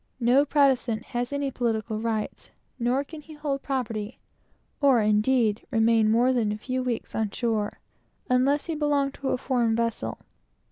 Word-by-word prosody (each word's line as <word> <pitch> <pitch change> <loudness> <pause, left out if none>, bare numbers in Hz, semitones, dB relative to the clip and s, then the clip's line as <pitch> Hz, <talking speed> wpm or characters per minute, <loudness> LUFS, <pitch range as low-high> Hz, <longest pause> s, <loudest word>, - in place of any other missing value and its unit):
No 250 +4 +4
Protestant 265 -6 +2
has 245 +1 -1
any 280 -1 -1
civil 220 -2 -1
rights, 220 -1 -3 0.3
nor 245 +3 +1
can 305 +2 -10
he 310 +1 -13
hold 290 -2 -2
any - - -40
property, 230 -5 -3 0.6
or, 275 -4 +5
indeed, 215 +1 +2
remain 225 -2 +3
more 240 +4 +3
than 225 -4 +1
a 210 - -3
few 255 +4 -3
weeks 245 -3 -3
on 220 -1 0
shore, 215 -1 -2 0.5
unless 265 +3 +2
he 330 - -3
belong 290 -2 +1
to 270 -1 -2
some 240 -3 +1
vessel. 230 - -2
245 Hz, 155 wpm, -26 LUFS, 220-275 Hz, 0.6 s, or